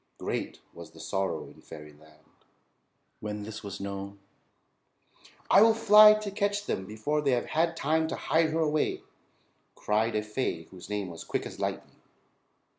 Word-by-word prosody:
Great - - -4
was - - -11
the - - -15
sorrow 95 0 -2
in - - -16
fairyland 75 0 -14 1.0
when 105 -1 -5
this 110 +1 -7
was 100 -3 -7
known. 100 0 -6 1.3
"I 195 - +6
will 225 0 +6
fly 215 -1 +8
to 215 -1 -5
catch 205 0 -1
them 95 - -3
before 110 +8 -2
they 140 -3 +1
have 120 - 0
had 165 +1 0
time 160 +2 +1
to - - -3
hide 160 0 +1
her 160 +1 0
away," 155 -1 0 0.7
cried 110 +2 0
a 105 - 0
fay 105 -6 -3
whose 95 +2 -13
name 105 -2 -3
was 85 -1 -9
Quick - - -3
As - - -9
Lightning. - - -5
110 Hz, 160 wpm, -28 LUFS, 100-165 Hz, 1.3 s, fly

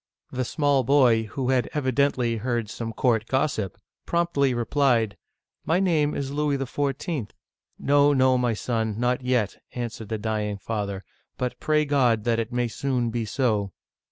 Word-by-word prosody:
The 130 0 -1
small 145 -1 +2
boy 120 -4 +4
— 110 - -14
who 130 -1 0
had 130 -2 +1
evidently 130 -4 +1
heard 115 -1 -2
some 115 -1 -4
court 115 -1 +1
gossip 130 - -1
— - - -64
promptly 170 -6 +1
replied, 120 -3 +1 0.5
"My 165 +3 +2
name 160 -6 +2
is 140 -1 -3
Louis 145 -1 0
XIV.'' 135 - -2 0.3
" - - -65
No, 145 +1 +4
no, 130 -2 +4
my 125 -2 +1
son, 110 -1 -2
not 125 +1 +1
yet," 125 -5 0
answered 115 -3 -5
the 110 - -1
dying 105 -1 -2
father; 100 -2 -4 0.2
" - - -45
but 125 0 -3
pray 150 0 +2
God 125 -7 +2
that 115 0 +1
it 115 +1 -3
may 120 0 0
soon 125 0 -1
be 115 -1 -2
so." 105 -5 0
125 Hz, 170 wpm, -25 LUFS, 115-140 Hz, 0.5 s, boy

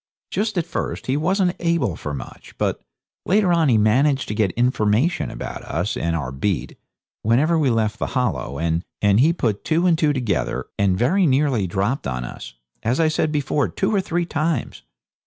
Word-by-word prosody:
Just 215 -1 -1
at 170 - +1
first - - -4
he 130 - 0
wasn't 180 +4 +1
able 165 - 0
for 75 - -5
much, 70 -4 -9
but - - -1 0.4
later 195 -2 +3
on 165 -4 +3
he 115 - +4
managed 135 +7 +3
to - - -1
get 105 -2 +1
information 120 +5 +1
about - - -6
us 85 +7 -2
and 85 0 -1
our 70 -6 -3
beat, 85 +8 -2 0.5
whenever 135 +10 +3
we 145 -4 +2
left 110 -2 0
the - - -1
Hollow, 110 - -1
and 80 +2 0 0.2
he 105 +10 +5
put 115 - -1
two 165 +2 +1
and 175 -2 +4
two 155 -2 +2
together, 125 -8 -1
and 95 -2 +2
very 175 - +3
nearly 130 -7 +2
dropped 100 - -1
on 65 -1 -3
us, - - -9 0.3
as 120 +6 0
I 160 -1 +4
said 155 0 0
before, 145 -1 0
two 195 +3 -1
or 200 - +3
three 175 -2 -1
times. 155 - -2
130 Hz, 185 wpm, -22 LUFS, 105-165 Hz, 0.5 s, he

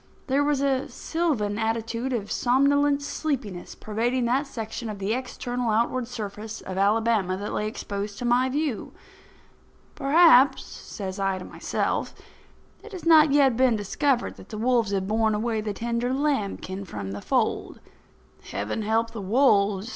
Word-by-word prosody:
There 280 +1 +2
was 290 -1 +1
a 275 -1 0
sylvan 255 -12 -1
attitude 230 +3 -2
of 215 -5 -3
somnolent 280 +3 +2
sleepiness 275 - -4
pervading 235 +4 -1
that 265 +5 +1
section 225 -2 -5
of 210 - -5
the 195 +2 -1
external 245 -1 -3
outward 235 +3 +1
surface 215 -2 -6
of 190 - -6
Alabama 205 -1 +2
that 205 +2 -5
lay 210 - -1
exposed 205 -1 -5
to 245 - -4
my 245 +2 +3
view. 285 -3 -2 1.0
"Perhaps," 280 -2 +5
says 190 -1 -7
I 195 -1 0
to 185 - -8
myself, - - -2 0.7
"it 445 - -12
has 365 - -7
not 310 -3 +7
yet 275 -4 +4
been 255 -1 +3
discovered 240 +5 0
that - - -14
the 215 - -6
wolves 235 -1 +2
have 195 -1 -1
borne 220 0 +1
away 220 0 -1
the 210 0 -3
tender 235 +3 -2
lambkin 215 -9 -1
from 100 - -6
the 100 +1 -6
fold. - - -1 0.7
Heaven 105 - -3
help 225 +2 0
the 220 - -6
wolves!" 205 -2 +2
230 Hz, 155 wpm, -25 LUFS, 205-265 Hz, 1.0 s, not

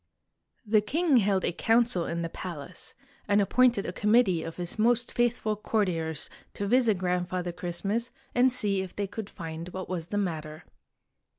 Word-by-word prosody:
The 215 0 +4
king 295 +6 +2
held 200 -3 +2
a - - +1
council 225 -2 +2
in 170 0 -2
the 165 - -3
palace, 170 -2 -8 0.3
and 205 0 +4
appointed 235 +1 +3
a 180 - -4
committee 210 -4 +3
of 165 0 -6
his 175 +4 -4
most 240 +2 +2
faithful 240 -3 +1
courtiers 175 -8 -1 0.3
to. 200 - -2
visit 230 -1 +3
Grandfather 180 0 -1
Christmas, 195 +7 -2 0.2
and 250 +1 +4
see 205 -6 +1
if 190 -2 -7
they 205 - -1
could 205 +1 -6
find 165 -1 -7
what 185 +1 -6
was 170 -3 -3
the 205 - -3
matter. 155 -5 -3
195 Hz, 165 wpm, -28 LUFS, 175-225 Hz, 0.3 s, The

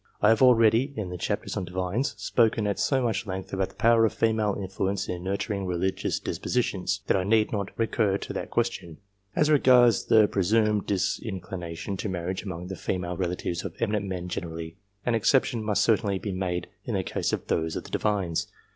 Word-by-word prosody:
I 105 - +4
have 110 0 +4
already, 125 +2 +5
in 100 -6 -4
the 90 - -4
chapter - - -2
on - - -2
Divines, 95 +8 -2
spoken 110 +1 +2
at 100 -1 -1
so 135 -2 +2
much 115 -2 -1
length 95 0 -5
about 95 -1 0
the - - -20
power 115 0 +4
of 110 - +2
female 110 -2 +1
influence 95 0 -2
in 90 -1 -4
nurturing 100 0 -2
religious 90 +1 -1
dispositions, 100 -5 -1
that - - +2
I 95 - +1
need 110 +2 +2
not 100 -3 -2
recur 110 -3 +1
to - - -6
that - - -4
question. 85 -3 -2 0.4
As 150 0 +3
regards 125 -6 +5
the 110 -2 +5
presumed 105 +1 +1
disinclination 95 -2 -3
to 105 - -3
marriage 90 +1 -3
among 90 -3 -6
the 95 +1 -5
female 90 -1 -3
relatives 85 -1 -2
of 85 -4 -6
eminent 105 -3 0
men 90 -2 -4
gener 85 -1 -4
ally, 80 0 -6 0.3
an 120 - +1
exception 115 +1 +2
must 105 -1 +2
certainly 105 -3 +2
be 100 +1 -4
made 90 -1 -2 0.2
in - - -3
the - - 0
case - - -2
of - - -2
those 80 0 -1
of - - -4
the - - -13
Divines. 95 -6 0
100 Hz, 195 wpm, -27 LUFS, 90-110 Hz, 0.4 s, already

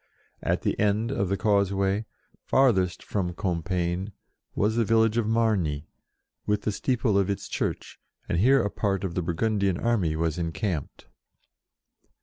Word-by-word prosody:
At - - -1
the - - -1
end 105 +3 +1
of 100 -8 -1
the 100 - 0
causeway, 100 0 +1 0.4
farthest 95 -10 +2
from 90 -4 -2
Com 90 -4 -1
piegne,"was 90 +4 -3
the 115 - +3
village 115 0 +3
of 120 -2 +1
Margny, 100 -10 +1 0.6
with 105 0 +1
the 105 - 0
steeple 115 -2 +1
of 100 0 +1
its 100 - -3
church, - - -3 0.3
and 85 - 0
here 130 +4 +5
a 100 - -1
part 100 -2 -1
of 95 -3 -2
the 90 - -1
Burgundian 95 +2 0
army 100 -10 +1
was 80 +1 -1
encamped. 85 -1 -3
100 Hz, 145 wpm, -26 LUFS, 90-110 Hz, 0.6 s, here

